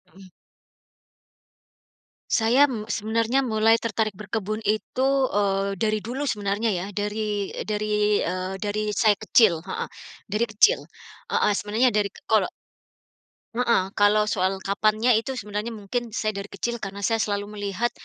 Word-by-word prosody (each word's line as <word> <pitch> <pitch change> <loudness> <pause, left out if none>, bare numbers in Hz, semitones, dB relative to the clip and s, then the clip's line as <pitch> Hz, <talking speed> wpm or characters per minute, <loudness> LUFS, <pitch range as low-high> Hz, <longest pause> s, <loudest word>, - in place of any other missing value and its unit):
Mhm. 195 -1 -14 2.0
Saya, 245 +6 +4
mmm, 220 -5 -5
sebenarnya 225 +4 +1
mulai 225 -3 +3
tertarik 220 -1 -1
berkebun 215 +1 -4
itu, 215 +5 0 0.2
eee, 195 -1 0
dari 215 -1 0
dulu 265 +5 -3
sebenarnya 205 +1 0
ya 175 +1 -3
dari 205 0 -2
dari, 210 0 +1
eee, 185 +1 -3
dari 210 +1 -2
saya 210 0 +3
kecil, 205 -6 +3
heeh. 190 - -4 0.4
Dari 210 +3 0
kecil, 210 - +4 0.5
heeh, 210 - +3
sebenarnya 215 +5 +1
dari 210 -4 +1 0.2
kolo 215 -4 +3 1.1
Heeh, 235 -5 +3
kalau 210 +1 +4
soal 190 -1 0
kapannya 215 +5 +2
itu 225 +4 -1
sebenarnya 210 +2 -4
mungkin 225 +2 -4
saya 215 -1 -2
dari 200 +1 -6
kecil 235 -1 -4
karena 195 0 -5
saya 225 +3 +1
selalu 205 -2 -1
melihat, 205 +3 -2
210 Hz, 135 wpm, -24 LUFS, 200-225 Hz, 2.0 s, Saya